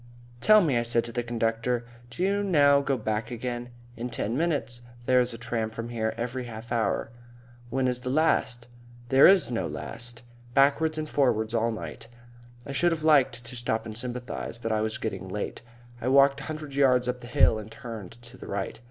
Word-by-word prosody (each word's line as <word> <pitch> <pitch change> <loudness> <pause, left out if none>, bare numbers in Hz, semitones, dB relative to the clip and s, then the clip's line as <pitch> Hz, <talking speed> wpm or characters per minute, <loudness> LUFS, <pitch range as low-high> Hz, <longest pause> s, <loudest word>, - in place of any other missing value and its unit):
"Tell 215 - +6
me," 140 -9 +2
I - - +1
said 120 0 +1
to 120 - -6
the 120 +1 -1
conductor, 115 +1 -1 0.2
"do 150 +9 -4
you 200 +1 +2
now 145 -7 +4
go 140 -1 0
back 110 0 -2
again?" 120 0 -4 0.3
"In 120 +2 -4
ten 115 -1 -2
minutes. 140 -7 -1 0.2
There's 125 -1 +3
a 115 - -7
tram 120 -2 -2
from 115 +1 -6
here 110 -2 -2
every 125 +2 -3
half 115 0 -9
hour." 115 0 0 0.6
"When 130 +1 0
is 125 -1 0
the 125 - -5
last?" 130 -5 +1 0.4
"There's 155 +6 +6
no 115 - -1
last. 120 0 -6 0.3
Backwards 145 +3 +3
and 155 0 -3
forwards 115 -7 +1
all 115 0 +1
night." 115 +1 -7 0.6
I 140 - -6
should 175 +6 +2
have 160 -2 -2
liked 135 -6 +4
to 125 +2 -8
stop 115 -2 -2
and 110 -1 -7
sympathise, 125 0 -5
but 115 -1 -3
it 110 -1 +1
was 110 0 -1
getting 95 -4 -4
late. 105 +2 -4 0.4
I 120 - -2
walked 140 +1 +5
a - - -7
hundred 155 -2 -6
yards 130 -3 +3
up 125 0 -2
the 120 - -9
hill 115 -2 +4
and 110 +1 -10
turned 115 -8 -8
to 120 +2 -13
the - - -10
right.... - - -4
120 Hz, 195 wpm, -27 LUFS, 115-140 Hz, 0.6 s, Tell